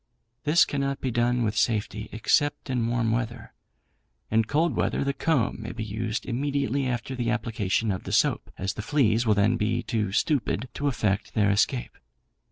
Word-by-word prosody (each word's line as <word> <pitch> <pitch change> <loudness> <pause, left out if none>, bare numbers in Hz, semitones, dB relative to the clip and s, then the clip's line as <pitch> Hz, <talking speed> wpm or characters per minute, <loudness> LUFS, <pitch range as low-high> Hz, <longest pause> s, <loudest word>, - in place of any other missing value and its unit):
This 155 +3 +5
cannot 140 -1 -2
be 130 - -2
done 120 +1 +1
with 110 -1 -1
safety, 105 -1 0
except 135 +5 +1
in 120 -3 0
warm 115 -1 +1
weather. 115 -1 -3 0.8
In 110 0 +3
cold 155 +6 +1
weather, - - 0
the 140 0 0
comb 135 -7 0
may 110 - -6
be 110 -1 -4
used 110 +2 -3
immediately 140 +1 -1
after 125 +1 -3
the 120 -2 -1
application 115 -3 0
of 95 - -4
the - - -5
soap, - - +2
as 95 +1 -2
the 105 - -5
fleas 115 -2 +2
will 105 - +4
then 105 +4 +3
be 105 0 0
too 105 -4 -1
stupid 130 0 0
to 145 - -2
effect 105 -6 -1
their 105 -2 +3
escape. 60 -11 0
115 Hz, 175 wpm, -26 LUFS, 110-130 Hz, 0.8 s, This